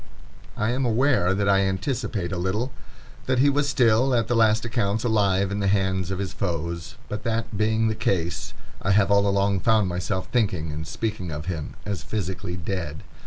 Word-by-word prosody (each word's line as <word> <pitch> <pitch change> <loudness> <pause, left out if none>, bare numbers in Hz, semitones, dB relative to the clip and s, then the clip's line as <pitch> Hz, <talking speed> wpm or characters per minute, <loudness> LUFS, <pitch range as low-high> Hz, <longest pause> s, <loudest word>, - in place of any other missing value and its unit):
I 110 +2 +1
am 130 +2 0
aware 120 -6 +2
that 100 0 0
I 100 -1 +5
anticipate 95 -1 -1
a 95 - -2
little, 105 +8 -1 0.6
that 130 0 +2
he 140 +3 +5
was 145 0 +1
still, 125 -1 +3
at 115 -2 +1
the 120 - +1
last 110 0 +3
accounts, 110 -2 0
alive 100 -4 +2
in 100 - -2
the 100 - 0
hands 95 -2 +1
of 95 - -2
his 95 -1 -4
foes; 85 -2 -3
but 105 0 -4
that 115 -2 -2
being 110 +2 +2
the 110 - +1
case, 95 -6 -2 0.3
I 95 - +2
have 100 0 +3
all 100 0 +4
along 100 0 +2
found 110 0 +3
myself 90 +1 -2
thinking 95 -10 0
and 75 +1 -5
speaking 105 -2 -3
of 75 0 -5
him 80 -5 -4
as 100 -5 -3
physically 95 -4 -4
dead. 85 -3 -4
100 Hz, 190 wpm, -25 LUFS, 95-110 Hz, 0.6 s, I